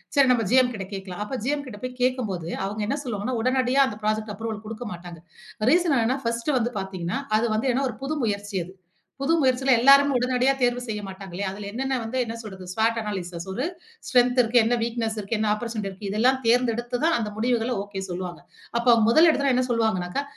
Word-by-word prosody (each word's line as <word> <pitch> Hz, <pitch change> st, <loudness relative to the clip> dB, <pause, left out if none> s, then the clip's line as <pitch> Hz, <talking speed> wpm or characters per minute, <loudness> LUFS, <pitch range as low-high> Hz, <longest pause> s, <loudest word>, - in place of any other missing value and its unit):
சரி 275 Hz, -2 st, +5 dB
நம்ம 225 Hz, -3 st, 0 dB
ஜிஎம் 255 Hz, -1 st, +4 dB
கிட்ட 195 Hz, -2 st, -6 dB
கேட்கலாம் 195 Hz, +1 st, -5 dB
அப்போ 260 Hz, +3 st, -4 dB
ஜிஎம் 285 Hz, 0 st, -1 dB
கிட்ட 205 Hz, -4 st, -9 dB
போய் 255 Hz, 0 st, -7 dB
கேட்கும்போது 220 Hz, -10 st, -1 dB, 0.2 s
அவங்க 210 Hz, +2 st, -4 dB
என்ன 280 Hz, -, 0 dB
சொல்லுவாங்கன்னா 235 Hz, +2 st, -2 dB
உடனடியா 255 Hz, +2 st, +2 dB
அந்த 210 Hz, -5 st, -5 dB
அப்ரூவல 215 Hz, -1 st, -2 dB
ப்ராஜெக்ட் 220 Hz, -1 st, -4 dB
கொடுக்க 225 Hz, +2 st, -6 dB
மாட்டாங்க. 175 Hz, -1 st, -10 dB, 0.5 s
ரீசன் 340 Hz, -4 st, +3 dB
என்னென்னா 240 Hz, +4 st, +1 dB
ஃபர்ஸ்ட்டு 235 Hz, +5 st, -1 dB
வந்து 240 Hz, +1 st, -1 dB
பார்த்தீங்கன்னா 185 Hz, +2 st, -3 dB, 0.2 s
அது 220 Hz, +2 st, +2 dB
வந்து 225 Hz, +5 st, 0 dB
என்னா 270 Hz, -, 0 dB
ஒரு -, -, -8 dB
புது 280 Hz, +3 st, -2 dB
முயற்சி 205 Hz, -2 st, -2 dB
அது. 180 Hz, -, -12 dB, 0.5 s
புது 295 Hz, +4 st, +2 dB
முயற்சில 265 Hz, 0 st, +2 dB
எல்லாருமே 275 Hz, +3 st, +6 dB
உடனடியா 255 Hz, +2 st, +2 dB
தேர்வு 245 Hz, 0 st, +2 dB
செய்ய 215 Hz, -3 st, -4 dB
மாட்டாங்கில்லையா. 190 Hz, 0 st, -5 dB
அதில 200 Hz, +1 st, -7 dB
என்னென்ன 265 Hz, +3 st, -1 dB
வந்து 225 Hz, +3 st, -4 dB
என்ன 225 Hz, -, -5 dB
சொல்ற்து 190 Hz, -4 st, -9 dB
ஸ்வாட் 225 Hz, +3 st, +1 dB
அனாலிசிஸ் 180 Hz, -5 st, -5 dB
ஒரு 250 Hz, +9 st, -2 dB, 0.4 s
ஸ்ட்ரெங்த் 250 Hz, -1 st, +3 dB
இருக்கு, 240 Hz, +1 st, +3 dB
என்ன 240 Hz, +2 st, +2 dB
வீக்னெஸ் 230 Hz, -1 st, -2 dB
இருக்கு, 210 Hz, +2 st, -2 dB
என்ன 215 Hz, -, +1 dB
அப்போர்ட்யூனிட்டி 215 Hz, -2 st, -4 dB
இருக்கு. 195 Hz, +1 st, -7 dB
இதெல்லாம் 250 Hz, +6 st, +3 dB
தேர்ந்தெடுத்து 240 Hz, +1 st, +1 dB
தான் 330 Hz, +1 st, +3 dB
அந்த 215 Hz, -2 st, -2 dB
முடிவுகள 240 Hz, +1 st, +1 dB
ஓகே 200 Hz, -1 st, -6 dB
சொல்லுவாங்க. 175 Hz, 0 st, -5 dB, 0.4 s
அப்ப 235 Hz, 0 st, +5 dB
முதல் 320 Hz, +8 st, +6 dB
எடுத்தொன 280 Hz, -3 st, +2 dB
என்ன 255 Hz, -, +2 dB
சொல்வாங்கனாக்க 220 Hz, -3 st, 0 dB
230 Hz, 195 wpm, -25 LUFS, 205-255 Hz, 0.5 s, எல்லாருமே